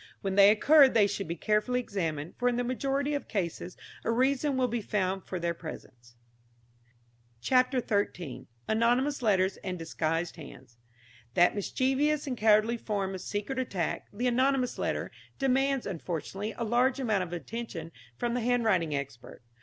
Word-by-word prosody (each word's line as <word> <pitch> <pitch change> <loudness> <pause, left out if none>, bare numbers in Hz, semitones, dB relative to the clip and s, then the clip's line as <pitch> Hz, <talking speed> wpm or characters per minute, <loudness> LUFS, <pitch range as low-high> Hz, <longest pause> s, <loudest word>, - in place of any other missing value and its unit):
When 195 -1 -2
they 200 0 +7
occur 275 +6 +6
they 225 -4 +4
should 200 -2 -3
be 170 - -3
carefully 215 +7 +1
examined, 165 -9 -3
for 245 - +3
in 245 - -1
the 245 - 0
majority 275 +3 -1
of 285 - -3
cases 180 -2 -3 0.3
a - - -2
reason 265 +4 +1
will 255 -1 +2
be 240 -1 -2
found 190 -2 -1
for 185 - -3
their 170 0 -1
presence. 120 -8 -11 1.2
CHAPTER 255 - +2
XIII. 180 - -2 0.2
ANONYMOUS 245 +6 +2
LETTERS 195 -4 +2
AND 185 -2 -5
DISGUISED 165 +1 -2
HANDS. 130 -6 -12 0.6
That 175 +1 +5
mischievous 270 +8 0
and 265 -3 -3
cowardly 220 +1 +3
form 200 -4 -2
of 185 - -6
secret 210 +8 -3
attack, 190 -10 -2
the 235 +5 -3
anonymous 255 +1 +1
letter, - - -2 0.3
demands, 270 0 +1
unfortunately, 190 +3 -4
a 235 - -2
large 245 +4 +2
amount 220 -7 +1
of 180 -2 -5
attention 175 -2 -6 0.3
from 240 -1 -1
the 245 - -1
handwriting 220 -10 +1
expert. 140 -4 -7
215 Hz, 155 wpm, -29 LUFS, 180-255 Hz, 1.2 s, they